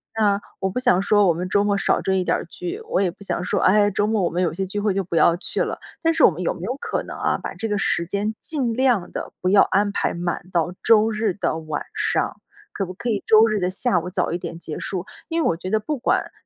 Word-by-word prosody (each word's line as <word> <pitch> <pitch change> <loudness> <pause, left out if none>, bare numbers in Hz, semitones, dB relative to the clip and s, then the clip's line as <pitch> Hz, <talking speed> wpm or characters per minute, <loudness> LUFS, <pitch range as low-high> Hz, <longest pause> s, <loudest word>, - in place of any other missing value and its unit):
那 205 -2 +2 0.2
我 190 - 0
不 190 - -6
想 245 -7 +3
说 205 0 +4
我 170 - +4
们 175 +3 -4
周 200 +2 +2
末 205 -1 +1
少 - - +1
追 190 0 +1
一 - - 0
点 - - +2
儿 - - -5
剧， 360 +4 -6
我 - - +1
也 190 - +2
不 180 +3 -12
想 195 - -2
说， - - 0
哎， 205 +2 +4
周 205 +1 0
末 215 -1 +1
我 175 - +2
们 180 +2 -1
有 170 - +1
些 190 +3 -3
聚 205 +2 -3
会 205 -2 +1
就 195 - 0
不 170 - -4
要 170 +1 +4
去 - - -3
了， - - -4 0.2
但 330 0 +2
是 320 - +5
我 - - +8
们 175 0 -6
有 180 - 0
没 - - -12
有 245 +7 -2
可 - - -2
能 - - -8
啊， - - 0
把 - - -5
这 225 - -4
个 210 - 0
时 170 -3 +1
间 205 +4 -2
尽 265 -7 -2
量 245 -6 +2
地 - - -5
不 185 - -1
要 200 +1 +6
安 205 +1 +1
排 - - 0
满 175 -1 -3
到 175 0 0
周 220 -1 +5
日 215 -2 0
的 170 -3 -1
晚 155 -2 -4
上， - - 0 0.3
可 195 - -2
不 185 - -7
可 235 +6 -4
以 210 -3 -1
周 220 +1 +6
日 215 -2 0
的 180 0 0
下 190 0 +1
午 170 - -7
早 - - -1
一 170 - -1
点 170 -1 -7
结 155 -2 -6
束， 185 -1 -4 0.2
因 330 0 0
为 - - +2
我 165 - 0
觉 185 +2 -6
得 220 - +3
不 290 +8 -3
管 250 - 0
200 Hz, 305 characters per minute, -22 LUFS, 180-220 Hz, 0.3 s, 我